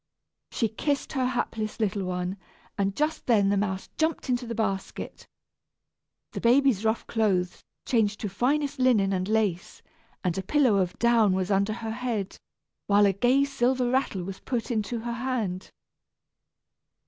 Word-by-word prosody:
She 230 - 0
kissed 275 +6 -2
her 260 -2 +1
hapless 225 -3 -3
little 205 -2 0
one, 180 +1 -3 0.4
and 200 -1 -1
just 305 +2 -1
then 205 -5 +4
the 200 - +2
mouse 190 -1 -2
jumped 315 -3 0
into 245 -1 0
the 230 - -4
basket. 195 -4 -4 1.0
The - - -5
baby's 245 -3 +4
rough 220 +1 0
clothes 190 -6 0 0.2
changed 215 -4 +1
to 210 - -2
finest 275 +8 0
linen 220 -7 +3
and 185 0 -1
lace, 210 -5 -1 0.4
and 180 -3 0
a - - -1
pillow 250 0 +3
of 180 -2 -1
down 230 -4 +4
was 190 +1 -1
under 200 +2 +2
her 225 0 -5
head, 225 -5 -3 0.5
while 205 0 +5
a 195 - +3
gay 245 +8 +3
silver 255 -2 +1
rattle 255 -8 0
was 190 +1 -7
put 245 -2 -3
into 225 +1 -2
her 235 +1 -3
hand. 230 -7 -3
220 Hz, 155 wpm, -27 LUFS, 195-250 Hz, 1.0 s, while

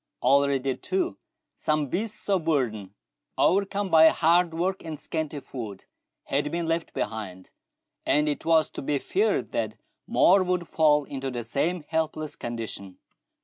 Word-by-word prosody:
Already, 135 0 +3
too, 365 -2 -2 0.4
some 155 -1 0
beasts 210 - -4
of 190 -5 +1
burden, 110 - -1 0.4
overcome 200 0 +1
by 160 0 +8
hard 170 +1 +3
work 185 +4 -2
and 160 -3 -6
scanty 155 -2 -3
food, 110 -8 -8 0.4
had 145 +2 -1
been 170 0 -2
left 165 0 -1
behind, 105 -4 -5 0.5
and 150 +1 +2
it 145 - -2
was 160 -1 +3
to - - -6
be 145 +1 0
feared 405 - 0
that - - -2 0.3
more 195 - +5
would 180 -2 -1
fall 150 -2 +3
into 135 -1 -5
the 120 -2 -4
same 155 +9 -1
helpless 155 -1 -2
condition. 110 -5 -6
155 Hz, 145 wpm, -26 LUFS, 135-170 Hz, 0.5 s, by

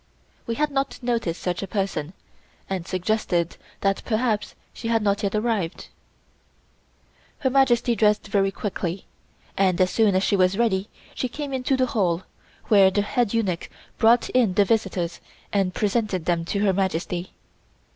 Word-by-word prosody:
We 230 - -1
had 300 +4 0
not 275 0 -1
noticed 230 -8 -1
such 175 -2 -1
a 195 - -4
person, 190 -6 -2 0.5
and 185 -2 -4
suggested 185 -3 -1 0.2
that 195 0 +1
perhaps 220 -2 -1 0.2
she 230 - -6
had 225 -1 +2
not 200 0 +1
yet 200 -1 -1
arrived. 215 -6 -1 1.5
Her 260 - 0
Majesty 245 -3 +3
dressed 210 -1 +2
very 195 -1 +2
quickly, 190 -2 -4 0.5
and 185 -3 +2
as 185 0 +3
soon 215 -4 +3
as 190 - +2
she 200 - +2
was 185 0 +3
ready 210 -4 +1 0.2
she 255 - -2
came 285 +1 -5
into 260 +1 0
the 260 - +3
hall, 185 -7 0 0.4
where 195 -3 +6
the 200 +2 0
head 235 0 0
eunuch 190 -7 -1 0.3
brought 230 +2 +5
in 230 -8 +2
the 205 - +5
visitors 195 -6 -1 0.3
and 195 -2 +2
presented 205 -4 0
them 170 -1 0
to 200 +4 -1
Her 195 - +3
Majesty. 180 -1 -2
200 Hz, 155 wpm, -24 LUFS, 185-230 Hz, 1.5 s, where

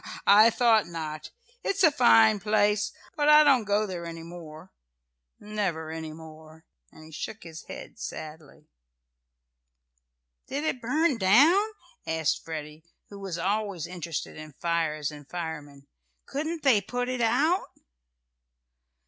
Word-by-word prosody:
I 210 +3 +7
thought 225 -3 +3
not. 155 -2 -6 0.3
It's 395 - 0
a 320 - +7
fine 225 -6 +5
place. 210 0 +1 0.2
But 295 -2 +2
I 300 0 +8
don't 265 -6 +4
go 205 +1 +1
there 175 -4 -6
any 165 0 -8
more 165 0 -11 0.7
never 190 -7 -3
any 160 -1 -6
more," 160 0 -13 0.3
and 155 - -15
he 160 - -14
shook 215 +7 -7
his 160 -2 -10
head - - -10
sadly. 155 -2 -9 1.8
"Did 285 +2 -3
it 260 -5 -2
burn 285 +2 +1
down?" 295 - +5 0.4
asked 160 -1 0
Freddie, 155 -1 -7 0.3
who 200 - -10
was 190 -4 -5
always 195 -1 -2
interested 170 -3 -6
in 155 -1 -10
fires 155 -2 -1
and 145 -1 -13
firemen. 150 -5 -7 0.4
"Couldn't 315 +3 -4
they 250 -7 +4
put 245 +5 -3
it 255 -1 -2
out?" 310 - +2
190 Hz, 130 wpm, -27 LUFS, 160-235 Hz, 1.8 s, I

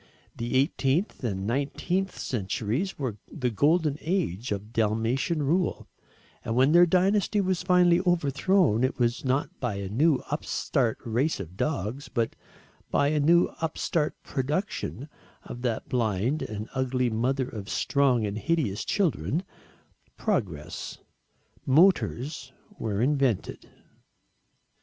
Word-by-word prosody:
The 130 +4 +2
18th 145 +3 -1
and 100 -4 -2
19th 165 - -1
centuries 115 - -2
were 125 -7 -3
the 125 -6 -1
golden 150 - +2
age 125 - -1
of 105 +2 -4
Dalmatian 115 +8 0
rule, 170 +5 0 0.6
and 115 - -2
when 130 +4 +4
their 175 +1 +7
dynasty 195 +4 +2
was 185 -2 0
finally 180 -1 +4
overthrown, 165 - +2
it 130 - 0
was 120 -1 0
not 135 +2 0
by 120 -5 -2
a 100 -1 -4
new 140 +6 +2
upstart 135 -5 0
race 125 +8 0
of 90 -2 -7
dogs, 135 - -2
but 115 -3 -1 0.5
by 140 - +2
a 150 0 +1
new 170 +4 +4
upstart 160 -1 -1
production 145 0 -3 0.4
of 120 - -8
that 120 -3 -2
blind 120 +3 0
and 105 0 -5
ugly 125 -1 0
mother 125 +4 0
of 110 -6 -7
strong 130 -5 +2
and 105 +1 -3
hideous 135 - 0
children 160 - 0 0.7
progress. 95 - -3 0.7
Motors 140 -3 +2 0.3
were 105 0 -1
invented. 135 -6 0
135 Hz, 120 wpm, -27 LUFS, 115-160 Hz, 0.7 s, their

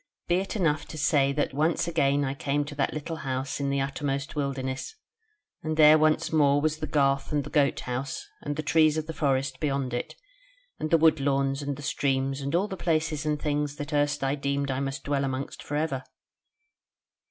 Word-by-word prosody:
Be 175 - +3
it 195 +3 -3
enough 160 -7 +1
to 155 - -8
say 145 -2 +3
that 145 -1 -1
once 155 +4 +1
again 145 -4 +2
I 135 - -1
came 145 +1 -1
to 145 - -7
that 140 -1 0
little 155 +2 -5
house 135 -1 -3
in 140 -1 -1
the 140 0 +1
uttermost 140 +1 -3
wilderness, 135 - -3 0.7
and 155 0 -3
there 155 0 +8
once 155 +1 +2
more 145 -2 +4
was 155 +1 0
the 155 - -4
garth 140 -1 +1
and 145 -1 +1
the 145 - -9
goat 145 -3 +2
house, 130 +2 -4 0.2
and 145 0 -3
the 155 - -3
trees 155 0 +4
of 155 - -2
the 160 - -5
forest 135 -3 0
beyond 140 -4 -1
it, 120 - -3 0.6
and 155 - -2
the 165 - +5
wood 160 -1 +4
lawns 135 0 +1
and 140 0 -3
the 145 - -9
streams 135 -1 0
and 140 +4 -2
all 190 +4 +2
the 195 - -5
places 155 -3 0
and 150 -1 0
things 145 -1 -1
that 145 0 -6
erst 145 -1 +1
I 135 0 +1
deemed 140 -1 -1
I 130 - -1
must 135 0 -3
dwell 140 -1 0
amongst 135 0 -4
for 145 - -5
ever." 145 -4 -1
145 Hz, 210 wpm, -27 LUFS, 135-155 Hz, 0.7 s, there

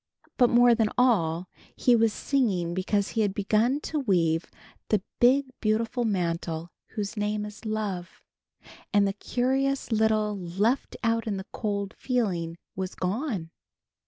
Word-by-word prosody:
But 245 -3 +5
more 240 0 +6
than 225 -2 +2
all 185 -9 +2 0.3
he 245 - +4
was 225 -1 +3
singing 200 -11 0
because 195 +2 0
he 225 - 0
had 200 -2 0
begun 220 +7 +2
to 305 - -2
weave 170 - +1 0.4
the 210 -3 +1 0.2
big 265 +3 +5
beautiful 230 +2 0
mantle 170 -4 -2 0.2
whose 205 0 -3
name 210 0 -1
is 210 +2 -10
Love, 205 -5 -4 0.7
and 205 -1 +4
the 195 - -1
curious 265 +5 0
little 215 -1 +2
left 195 +7 -1
out 230 0 +1
in 205 -2 -1
the 190 - -6
cold 200 -2 -2
feeling 180 -10 -1 0.2
was 190 0 -4
gone. 190 - -2
210 Hz, 140 wpm, -27 LUFS, 185-235 Hz, 0.7 s, more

